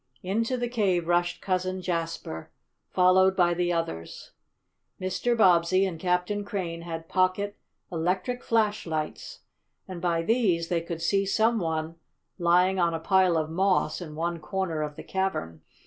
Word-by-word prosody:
Into 230 +7 0
the 245 0 -1
cave 195 -8 0
rushed 175 0 +1
Cousin 185 0 -1
Jasper, 165 - -4 0.4
followed 185 +1 +4
by 175 -2 +3
the 175 0 0
others. 85 - -4 0.7
Mr. 190 +6 0
Bobbsey 185 -1 +4
and 175 -4 -4
Captain 180 +4 0
Crane 180 -5 -4
had 165 -1 -6
pocket 185 +3 +1 0.4
electric 180 +9 -1
flashlights, 205 -9 -1 0.5
and 180 -2 -7
by 170 -2 +1
these 185 -6 +1
they 170 -2 +1
could 165 0 -6
see 195 +2 +2
some 225 +3 +2
one 160 -1 -2 0.4
lying 180 +2 +3
on 170 -1 +2
a - - -3
pile 185 0 +3
of 155 0 -1
moss 185 -2 +1
in 155 -3 -7
one 170 +1 -2
corner 165 0 -2
of 150 -1 -4
the - - -9
cavern. 135 - -2
180 Hz, 150 wpm, -27 LUFS, 165-190 Hz, 0.7 s, followed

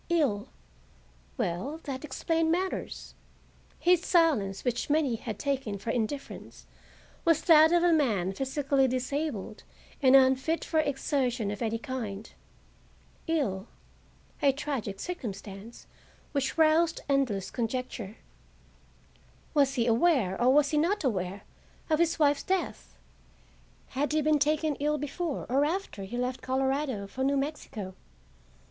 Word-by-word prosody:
Ill,—well, 250 - -4
that 270 -2 -5
explained 320 +3 0
matters. 370 +3 -3 0.6
His 355 -1 +3
silence, 280 - +2
which 245 +2 -1
many 295 -4 +2
had 220 -2 -6
taken 265 -7 -2
for 210 +4 -3
indifference, 245 +5 -4 0.6
was 330 -3 +3
that 320 -1 +7
of 345 0 +4
a 350 -1 +5
man 210 - +1
physically 270 +2 +1
disabled 255 -4 -3 0.4
and 265 -1 +6
unfit 265 +5 +3
for 320 - +1
exertion 270 -6 0
of 205 - -6
any 230 -1 0
kind. 225 -6 -6 0.9
Ill,—a 275 - -3
tragic 265 -9 -4
circumstance 210 - -7 0.5
which 280 +1 -1
roused 320 +1 +3
endless 255 -9 0
conjecture. 235 -3 -3 1.4
Was 275 -2 +3
he 235 -3 +1
aware, 235 - +3
or 250 +2 +5
was 285 +1 +4
he 300 - +2
not 365 +6 +1
aware, 195 -5 -2 0.5
of 310 - +3
his 335 -1 +2
wife's 290 -2 +3
death? 380 -1 -3 0.9
Had 290 +3 -1
he 310 -1 +2
been 305 0 +3
taken 305 +1 +1
ill 300 +1 +1
before 295 +2 -3
or 270 +3 +2
after 315 - -2
he 240 +5 -6
left 250 +1 -2
Colorado 265 -4 -1
for 255 +7 -4
New 280 +1 +2
Mexico? 270 -9 -4
270 Hz, 125 wpm, -29 LUFS, 230-310 Hz, 1.4 s, that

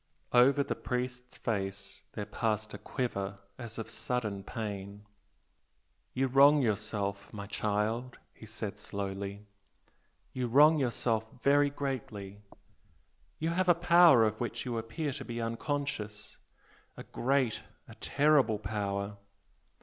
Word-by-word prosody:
Over 135 +4 +6
the 140 - -2
priest's 125 0 -4
face 100 -3 -3
there 105 - -4
passed 105 0 -2
a - - -7
quiver 100 -6 -3 0.2
as 115 -2 -7
of 115 - -4
sudden 110 -4 -3
pain. 100 -2 -6 1.1
"You 135 +1 +2
wrong 140 +3 +6
yourself, 100 -2 -2
my 100 -1 -6
child" 105 +4 -1 0.2
he 110 - -13
said, 110 -1 -6
slowly 100 0 -5 0.9
"You 125 -1 -1
wrong 150 +6 +6
yourself 115 -3 0 0.2
very 145 +1 +5
greatly! 110 -8 -5 1.0
You 160 +1 -1
have 180 +1 +1
a 175 - +7
power 170 -7 +7
of 110 0 0
which 120 - -3
you 120 -2 -2
appear 115 +7 -3
to 135 0 -6
be 120 -2 -5
unconscious 115 -3 -3 0.6
a - - -7
great, 130 -3 0 0.3
a - - -11
terrible 140 -7 +3
power! 100 -1 -3
115 Hz, 125 wpm, -31 LUFS, 105-135 Hz, 1.1 s, a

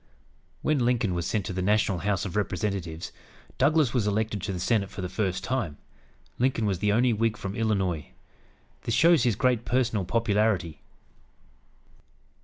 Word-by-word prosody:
When 155 -2 +2
Lincoln 120 -5 +1
was 85 0 -2
sent 105 -2 -1
to - - -4
the 95 - -2
national 100 -1 +2
House 100 +1 -1
of 95 - -5
Representatives, 95 -5 -2 0.5
Douglas 145 -1 +3
was 120 -5 +1
elected 105 0 -1
to 95 - -3
the 90 - -4
Senate 100 +1 +1
for 95 - -7
the - - -1
first 95 -1 -2
time. 100 - -2 0.6
Lincoln 125 -3 +1
was 95 -4 0
the 105 +1 +2
only 120 +3 +3
Whig 110 0 0
from 100 -2 -5
Illinois. 95 -8 0 0.7
This 115 - -1
shows 170 -3 +5
his 120 -4 +2
great 125 +1 +1
personal 120 -6 0
popularity. 100 -5 0
105 Hz, 160 wpm, -27 LUFS, 95-115 Hz, 0.7 s, shows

